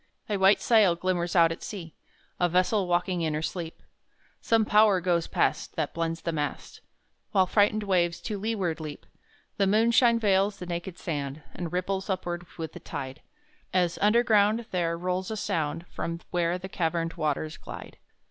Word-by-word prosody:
A 210 -3 0
white 190 +1 +5
sail 210 -7 +5
glimmers 175 0 -1
out 165 -2 +6
at 165 - -6
sea 170 -7 -7 0.5
A 175 - +3
vessel 185 +3 +2
walking 175 0 0
in 155 -2 0
her 155 - -2
sleep; 170 -1 -5 0.6
Some 225 -1 +3
Power 210 -2 +5
goes 175 -2 +1
past - - 0
That - - -2
bends 165 0 -2
the 170 - -1
mast, 150 -2 -4 0.5
While 190 -1 +5
frighted 210 +2 +2
waves 175 -4 +1
to 210 -3 -4
leeward 195 -6 -1
leap. 155 -2 -7 0.5
The 195 - +3
moonshine 230 +3 +4
veils 200 -2 +2
the 180 - -7
naked 175 +1 -5
sand 145 -2 -4
And 170 -3 -5
ripples 190 +2 -2
upward 175 -2 -3
with 160 -2 -5
the - - -8
tide, 130 0 -6 0.5
As 180 -2 +1
underground 215 0 +4
there 170 -2 0
rolls 180 +1 -2
a 220 - -3
sound 165 -5 -2
From 170 0 -4
where 175 0 +1
the 185 +1 -7
caverned 165 -2 -1
waters 155 0 -2
glide. - - -10
180 Hz, 165 wpm, -27 LUFS, 165-200 Hz, 0.6 s, out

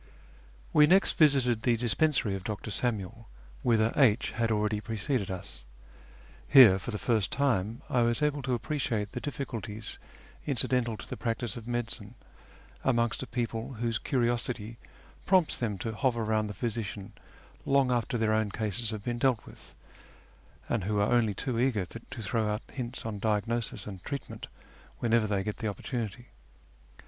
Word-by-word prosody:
We 150 0 +7
next 190 +4 +4
visited 135 -7 +4
the 120 -1 +2
dispensary 120 -1 +1
of 95 -1 -4
Dr. 105 +1 -4
Samuel, 110 -1 -2 0.3
whither 115 -1 +3
H 130 -4 +4
had 115 0 0
already 105 0 0
preceded 115 0 -2
us. 65 -10 -7 0.8
Here 120 -9 +9
for - - -6
the 105 - -2
first 110 -3 +1
time 120 -6 0
I 125 - +2
was 120 +5 +2
able 145 -1 +1
to 130 -1 0
appreciate 120 -6 -2
the 125 - -5
difficulties 115 -6 -5 0.5
incidental 125 -4 +1
to - - -10
the - - -6
practice 115 -2 -2
of 115 -1 -8
medicine 120 -3 -4 0.7
amongst 120 -2 +1
a 130 - -5
people 120 +1 -3
whose 115 -1 -1
curiosity 120 -3 -1 0.5
prompts 185 -4 +3
them 110 -5 -2
to 110 +4 -4
hover 120 0 0
round 110 -1 0
the 105 - -6
physician 105 -3 -4 0.5
long 135 -2 +3
after 120 +1 0
their 110 -1 +2
own 110 -1 +1
cases 110 +2 -2
have 110 -2 -4
been 120 0 -2
dealt 125 -3 +2
with, - - -14 0.9
and 115 -6 -1
who 105 +1 0
are 100 +3 +2
only 110 -4 +3
too 120 +2 -2
eager 120 -7 +1
to 115 +3 -9
throw 110 +2 0
out 105 +2 -2
hints 125 -2 -5
on 110 -3 -4
diagnosis 110 +2 -1
and 95 -3 -8
treatment 140 -1 -6 0.5
whenever 115 -2 +2
they 100 -2 0
get 105 +1 -4
the 110 - -3
oppor 100 - -5
tunity. 120 -1 -4
115 Hz, 160 wpm, -29 LUFS, 105-125 Hz, 0.9 s, Here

